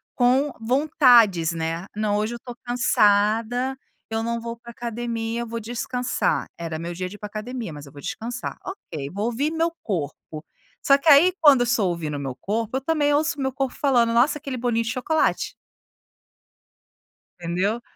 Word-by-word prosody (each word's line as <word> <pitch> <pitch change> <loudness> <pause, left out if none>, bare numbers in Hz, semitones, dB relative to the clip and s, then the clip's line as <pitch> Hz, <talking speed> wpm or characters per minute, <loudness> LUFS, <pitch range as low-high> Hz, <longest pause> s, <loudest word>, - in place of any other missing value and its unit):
com 260 +4 +3
vontades, 240 - +4
né: 165 +2 -3
“Não, 210 -1 0
hoje 215 +3 -1
eu - - -5
estou 245 0 -10
cansada, 230 +2 +2 0.3
eu 225 0 -1
não 235 +1 -2
vou 230 0 -5
para 235 +1 -14
a - - -6
academia, 235 -1 -3
eu 235 - -4
vou 230 +1 -4
descansar. 245 +2 -1
Era 165 -2 -5
meu 170 +2 -5
dia 185 +1 -4
de 200 - -10
ir - - -14
para - - -7
a - - -21
academia, 220 -3 -5
mas 145 -1 -10
eu - - -13
vou 145 - -12
descansar. 240 - -5
Ok, 160 - -7
vou 200 +3 -3
ouvir 250 +6 0
meu 330 +1 0
corpo.”, 155 -4 -4 0.4
só 275 - +6
que, 280 +3 +1
aí, 310 +6 +7
quando 290 -5 +7
eu - - +3
estou 225 -5 +2
ouvindo 165 -4 -3
o - - -5
meu 135 -2 -4
corpo, 225 - -2
eu 270 - -3
também 290 0 +1
ouço 300 +1 +1
o - - -2
meu 265 0 0
corpo 270 -1 -2
falando: 240 -5 +2
“Nossa, 250 +6 +3
aquele 275 -2 -5
bolinho 235 -1 0
de 220 - -1
chocolate”. 305 +7 0 1.9
Entendeu? 185 +7 -1
235 Hz, 190 wpm, -24 LUFS, 205-260 Hz, 1.9 s, aí